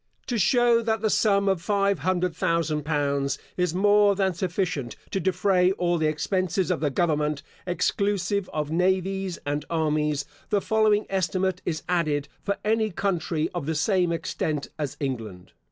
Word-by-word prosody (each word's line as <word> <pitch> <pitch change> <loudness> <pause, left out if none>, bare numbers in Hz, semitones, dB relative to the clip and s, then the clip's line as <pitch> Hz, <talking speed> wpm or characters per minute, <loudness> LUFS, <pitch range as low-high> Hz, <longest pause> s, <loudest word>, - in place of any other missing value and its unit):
To 240 -3 -1
show 240 +3 +4
that 220 -2 -1
the 220 -1 +1
sum 200 -2 +3
of 190 -3 +1
five 200 -1 +1
hundred 180 -1 0
thousand 160 -3 0
pounds 140 -2 0 0.2
is 180 -2 0
more 205 +1 +4
than 190 -1 +1
sufficient 180 -7 -2 0.2
to 195 - 0
defray 185 0 +2
all 175 -2 0
the 155 - +2
expenses 185 +3 0
of - - 0
the 150 0 +1
government, 150 -1 0 0.2
exclusive 200 +2 0
of 150 -1 -3
navies 190 +1 0
and 145 0 -1
armies, 150 -3 0 0.2
the 205 - +2
following 215 0 +2
estimate 190 -1 -1
is 155 -2 -2
added, 155 -5 0
for 200 0 -2
any 220 0 +2
country, 175 -4 -1
of 170 -5 -4
the 160 - -1
same 180 +2 +2
extent 155 -3 -2
as 145 -3 -3
England. 115 - -5
180 Hz, 155 wpm, -25 LUFS, 155-195 Hz, 0.2 s, show